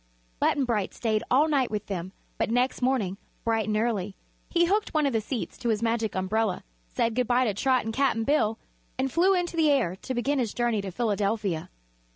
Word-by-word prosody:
Button 280 - +2
Bright 215 -5 -1
stayed 220 -2 0
all 280 +5 +4
night 280 -5 +2
with 210 -1 -3
them, 185 -2 -4 0.3
but - - +1
next 250 +3 +1
morning, 225 -7 0 0.2
bright 225 -2 0
and 210 0 +1
early, 210 -4 -1 0.3
he 345 -1 +3
hooked 410 +1 0
one 305 -1 +3
of 275 - +1
the 225 - +1
seats 235 +2 -5
to 240 - -1
his 220 0 0
Magic 225 -2 0
Umbrella, 190 +2 0 0.2
said 230 - 0
good 250 0 0
bye 250 +1 +3
to 215 - 0
Trot 255 +4 +1
and 225 - -3
Cap'n 255 -3 +1
Bill 225 -5 +2 0.4
and 265 0 0
flew 370 +6 +4
into 350 -1 -1
the 320 -2 +3
air 250 -11 +2
to 260 - -5
begin 275 +4 0
his 230 -5 -2
journey 240 -3 +1
to 195 - -5
Philadelphia. 205 -4 -1
230 Hz, 205 wpm, -27 LUFS, 210-265 Hz, 0.4 s, all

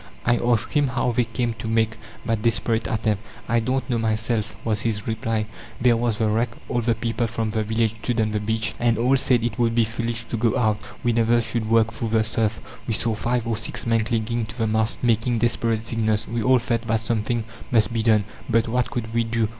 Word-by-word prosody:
I 120 0 +3
asked 120 -1 +1
him, 145 -2 +3
how 125 -1 0
they 120 +1 +1
came 115 +1 -2
to - - -5
make 110 0 +1 0.3
that 115 -3 0
desperate 110 -1 +1
attempt? 110 -2 0 0.3
"I 120 - +2
don't 130 +4 -1
know 120 -3 0
myself," 110 -1 -1
was 110 -2 +1
his 105 -2 -2
reply." 110 -1 -1 0.3
There 120 -1 +4
was 115 -2 0
the 110 - +1
wreck; 115 +3 +1 0.2
all 120 - 0
the 115 0 +1
people 115 +1 -1
from 110 -1 -2
the 110 0 0
village 110 +1 0
stood 120 -2 -1
on 110 -1 +1
the 105 - 0
beach, 110 +1 -1
and 120 -1 +2
all 125 +3 +3
said 125 -3 +3
it 115 -2 -2
would 115 -1 +2
be 120 - +4
foolish 115 +1 -3
to 115 - -4
go 115 0 +1
out; 110 -3 +2 0.2
we 120 -1 +2
never 115 +1 +3
should 115 -1 -2
work 115 0 +3
through 115 0 -3
the 110 0 +3
surf. 110 0 0 0.3
We 115 - +1
saw 115 +1 0
five 120 +2 -1
or 115 -1 0
six 115 - -2
men 115 -1 +3
clinging 115 0 -1
to 110 +3 -10
the 115 - +1
mast, 110 +2 0
making 115 0 +2
desperate 115 -1 0
signals. 110 -2 0
We 115 0 -2
all 130 +4 +5
felt 120 -1 -1
that 110 -1 +1
something 115 +1 -1 0.3
must 110 -2 +2
be 115 - 0
done, 110 -2 +4 0.3
but 115 0 +3
what 125 +2 0
could 115 -2 -4
we 115 0 +2
do? 115 -1 0
115 Hz, 230 wpm, -23 LUFS, 110-120 Hz, 0.3 s, all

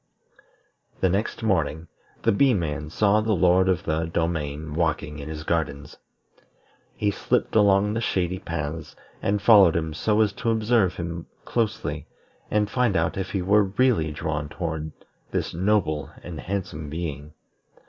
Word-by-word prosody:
The 95 - +3
next 100 +5 -1
morning, 80 -5 0 0.4
the 115 - +4
Bee 130 +4 +4
man 75 -4 -3
saw 105 +5 +3
the 110 0 +1
Lord 90 +1 +4
of 90 -2 +1
the 80 +1 -1
Domain 80 -2 -2
walking 80 -2 -1
in 70 +2 -7
his 75 -1 -6
gardens. 75 -4 -2 1.0
He 105 -1 0
slipped 100 - -1
along 100 -1 +4
the 115 - -1
shady 95 -4 -1
paths, 80 -3 -5 0.3
and 100 +1 +1
followed 100 -7 +7
him 80 -2 -1
so 105 +7 +1
as 105 -2 +2
to 115 - -2
observe 110 -4 +2
him 85 -1 -5 0.2
closely, 115 -3 -2 0.4
and 105 -1 +2
find 120 -3 +1
out 80 0 0
if 95 -1 -3
he 95 -3 -2
were 100 +2 +4
really 120 -12 +3
drawn 75 -1 -3
toward 80 -2 -4 0.4
this - - -2
noble 85 -6 +1
and 85 -2 -7
handsome 85 -6 -4
being. 75 -2 -5
85 Hz, 150 wpm, -25 LUFS, 80-105 Hz, 1.0 s, followed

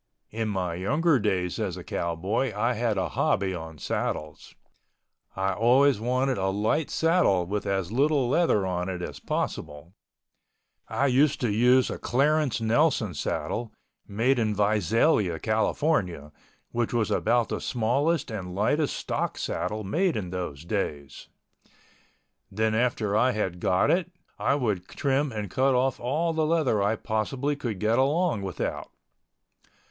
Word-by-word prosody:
In 110 0 -2
my 90 -4 -2
younger 145 - +2
days 95 -4 -1
as 95 -5 -2
a 90 - -8
cowboy 85 +11 -2
I 120 +4 +1
had 115 -2 -1
a 95 - -1
hobby 95 -1 0
on 80 -2 -7
saddles. 75 +1 -4 0.8
I 95 0 0
always 125 +5 +4
wanted 130 +1 0
a 95 - 0
light 110 +10 0
saddle 165 - +2
with 100 +3 -3
as 95 -2 -1
little 140 +1 +2
leather 130 - +2
on 90 0 -2
it 90 -2 -4
as - - -6
possible. 75 +5 -4 0.9
I 140 - 0
used 140 +2 +3
to 120 -4 +1
use 125 +4 +4
a - - -5
Clarence 145 0 +1
Nelson 115 - +2
saddle, 110 +9 -3 0.4
made 120 +6 +1
in 110 -2 0
Visalia, 105 - +2
California, 110 - 0 0.4
which 120 0 -1
was 115 -3 0
about 120 0 +2
the - - -3
smallest 135 +7 0
and 90 -4 -5
lightest 145 +9 +1
stock - - -3
saddle 110 +1 -3
made 165 - 0
in 90 -4 -4
those 85 -5 -5
days. 75 -8 -4 1.2
Then 110 +2 0
after 110 -3 0
I 125 +3 +3
had 95 -5 -2
got 90 +1 +2
it, 180 0 0 0.3
I - - +2
would 105 -10 -1
trim 140 0 0
and 105 -4 -5
cut 135 0 +2
off 130 0 +1
all 155 +7 0
the 160 -1 +1
leather 150 -10 +2
I 105 +3 +2
possibly 125 +7 -2
could 120 -7 -4
get 110 +4 +2
along 150 - +1
without. 95 -5 -4
110 Hz, 145 wpm, -26 LUFS, 95-135 Hz, 1.2 s, always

